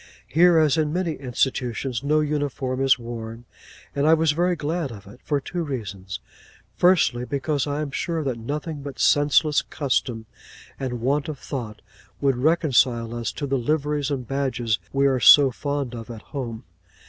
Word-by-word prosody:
Here, 170 +2 +4
as 155 -2 +4
in 150 -1 +1
many 175 0 -1
institutions, 125 -2 -2
no 155 +2 +2
uniform 145 -3 -2
is 135 -1 +5
worn; 115 -1 -7 0.5
and 140 +1 +1
I 160 - +7
was 160 -1 +2
very 175 +4 +1
glad 155 -2 -2
of 100 -4 -11
it, 105 +6 -14
for 145 -2 0
two 175 +5 -4
reasons. 105 - -5 0.6
Firstly, 175 -9 +3
because 140 +2 -1
I 145 +1 -2
am 150 -2 -4
sure 165 +2 -2
that 130 -4 -2
nothing 145 +5 -4
but 140 -1 -8
senseless 145 +1 +3
custom 125 -5 -2 0.5
and 125 -3 -4
want 140 +5 0
of 150 - -5
thought 115 -6 -6 0.4
would 135 -3 +1
reconcile 125 -6 +2
us 120 -1 -3
to 145 - -4
the 135 -1 0
liveries 150 +2 0
and 130 -5 -3
badges 125 -6 -1
we 140 0 +2
are 135 -2 +3
so 135 +5 +8
fond 140 -1 -3
of 115 0 -8
at 115 -2 -8
home. 120 -4 -5
140 Hz, 170 wpm, -24 LUFS, 120-150 Hz, 0.6 s, so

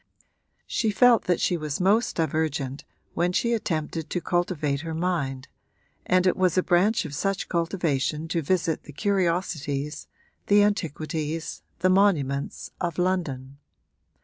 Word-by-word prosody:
She 220 - 0
felt 235 +2 +5
that 175 -2 +1
she 175 - +1
was 155 -3 -3
most 205 +6 +2
divergent 150 -4 -1 0.3
when 175 +1 +1
she 235 +5 +1
attempted 160 -7 -2
to 180 - -1
cultivate 170 -6 -1
her 165 -1 -5
mind, 140 -7 -2 0.6
and 185 0 +3
it 185 - +3
was 185 -1 +1
a 185 - +4
branch 185 +5 +2
of 150 - -6
such 195 +6 -1
cultivation 165 -3 -1
to 170 0 0
visit 165 0 0
the 145 - -11
curiosities, 165 -6 -1 0.4
the 205 0 +6
antiquities, 160 -5 -2 0.2
the 185 - +4
monuments 150 -9 +1
of 170 -3 -2
London. 145 -8 -2
170 Hz, 135 wpm, -25 LUFS, 150-185 Hz, 0.6 s, the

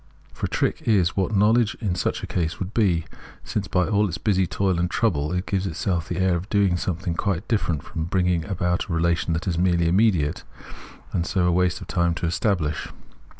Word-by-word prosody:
For - - -3
a - - -12
trick - - 0
is 95 -6 +3
what 95 +2 0
knowledge 110 +3 +3
in 105 -6 -1
such 90 - -2
a - - -1
case 85 -2 -2
would 95 +2 -5
be, 90 -8 +2 0.4
since 100 -2 -3
by 90 -2 +1
all 105 -1 +2
its 85 - -4
busy 95 -4 +1
toil 95 0 0
and 90 0 0
trouble 75 -11 0
it 90 +1 -1
gives 95 -1 -1
itself 85 0 -2
the 90 - -2
air 95 -1 +2
of 90 +5 -5
doing 100 -4 +3
something 90 0 -2
quite 100 +2 -2
different 85 - 0
from 80 -2 -4
bringing 90 -1 +1
about 90 -1 -1
a - - -2
relation 85 0 +1
that 80 +4 -3
is 85 -2 0
merely 85 -2 +2
immediate, 90 -5 +2 0.7
and 85 -1 0
so 90 -3 +1
a 90 - +3
waste 90 +2 +1
of 95 - -9
time 85 -2 +1
to 85 - -3
estabhsh. 85 -4 -1
90 Hz, 210 wpm, -24 LUFS, 85-100 Hz, 0.7 s, is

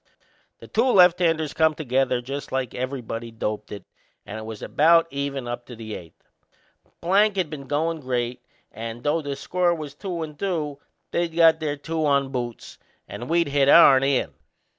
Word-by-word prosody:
The - - -13
two 245 +4 +2
lefthanders 170 -5 +4
come 160 -1 +2
together 130 -3 0
just 140 +3 -6
like 130 -3 -2
everybody'd 120 -3 -5
doped 105 -1 -4
it 100 - -8 0.4
and 110 - -7
it 110 - -8
was 110 -1 -8
about 165 +2 +4
even 140 -2 -3
up 120 0 -6
to 120 - -9
the 110 -1 -8
eighth. 85 -4 -11 0.7
Plank 200 +4 +3
had 180 -5 -1
been 140 -3 -7
goin' 160 +4 -1
great 125 -2 -3 0.3
and, 115 +1 -7
though 155 +3 +1
the 140 -2 -4
score 175 +5 0
was 150 -3 -7
two 175 +1 -5
and 150 -2 -9
two, 155 -7 -2 0.3
they'd 170 -1 -1
got 165 -1 +5
their 150 -2 -2
two 160 +2 -3
on 140 -2 +2
boots 120 -3 -6 0.3
and 120 - -8
we'd 170 -2 +2
hit 140 -1 +3
ourn 140 -4 +8
in. 135 -1 +1
145 Hz, 175 wpm, -24 LUFS, 125-165 Hz, 0.7 s, ourn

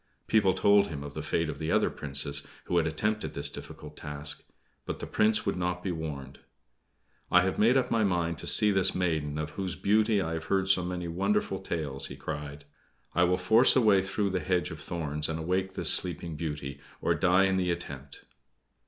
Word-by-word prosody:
People 100 -4 +3
told 100 +1 +4
him 75 -6 -6
of 75 0 -8
the - - -5
fate 85 - -1
of 80 - -5
the 80 0 -2
other - - +2
Princes, 70 0 +1 0.2
who 90 - -1
had 80 -1 +2
also 80 - -4
attempted 105 +5 -2
this - - -2
difficult 75 0 -10
task; 75 -1 -3 0.4
but - - -5
the - - -6
Prince 110 0 +2
would - - 0
not 90 0 -2
be 95 - -1
warned. 75 -5 -6 0.9
"I 90 0 +5
have 95 - -1
made 115 +5 +5
up 130 - 0
my 115 -1 +2
mind 85 -4 0
to - - -7
see 105 -1 +5
this 95 -2 +3
maiden 80 -5 -1
of 75 0 -4
whose 95 0 -4
beauty 105 +1 +2
I 80 -3 -2
have 80 -1 -4
heard 95 -1 0
so 95 -2 +4
many 90 0 -4
wonderful 95 +3 0
tales," 75 -7 -2
he - - -8
cried. 75 -1 -6 0.5
"I 90 +2 +4
will 90 +1 +2
force 110 +8 +5
a 130 - +5
way 105 -4 +5
through 100 +1 -1
the 95 - 0
hedge 90 -1 -1
of 80 - -8
thorns 75 -3 -3
and 80 - -2
awake 95 +3 -2
this - - +3
Sleeping 85 -2 -1
Beauty, 75 -3 -5 0.2
or - - +1
die 90 +2 +3
in 95 0 +1
the 90 -1 0
attempt!" 70 -5 -6
90 Hz, 210 wpm, -29 LUFS, 75-95 Hz, 0.9 s, I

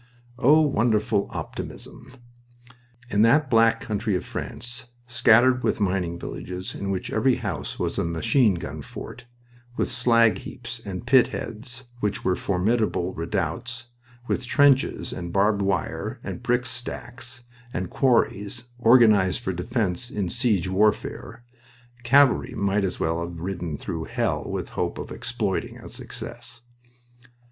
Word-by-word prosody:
Oh, 145 +5 +6
wonderful 110 -8 +2
optimism! 130 - -7 1.0
In 105 - +3
that 135 +5 +4
Black 115 0 +5
Country 105 -2 -1
of 90 - -2
France, 120 +1 -6 0.2
scattered 120 +1 +4
with - - 0
mining 90 -4 0
villages 90 +1 -5
in 100 - -4
which 95 -1 -3
every - - +3
house - - -4
was - - -2
a - - +1
machine 85 - +2
gun 85 - -6
fort, 125 - -9 0.5
with - - 0
slag 115 -2 +4
heaps 120 -1 -8
and 95 +3 -6
pit 130 0 +6
heads 115 +3 -6 0.2
which 105 -3 -2
were 95 -1 +3
formidable 100 -1 0
redoubts, 100 +8 -3 0.4
with - - -1
trenches 140 -1 +3
and 85 -1 -5
barbed 100 +2 +2
wire 95 -4 -2
and - - -5
brick 125 0 +1
stacks, 120 0 -6 0.3
and 90 -4 -4
quarries, 120 -4 +1 0.2
organized 110 -6 +5
for 95 - -2
defense 90 +4 -1
in 100 -6 -2
siege 110 -7 +1
warfare, 105 +4 0 0.6
cavalry 130 0 +4
might 100 -1 +1
as 95 - -2
well 80 +1 0
have 85 -1 -7
ridden 85 -4 -4
through - - -4
hell - - -1
with - - -3
hope - - -2
of - - -7
"exploiting" - - -3
success... 115 0 -8
110 Hz, 135 wpm, -25 LUFS, 95-120 Hz, 1.0 s, Oh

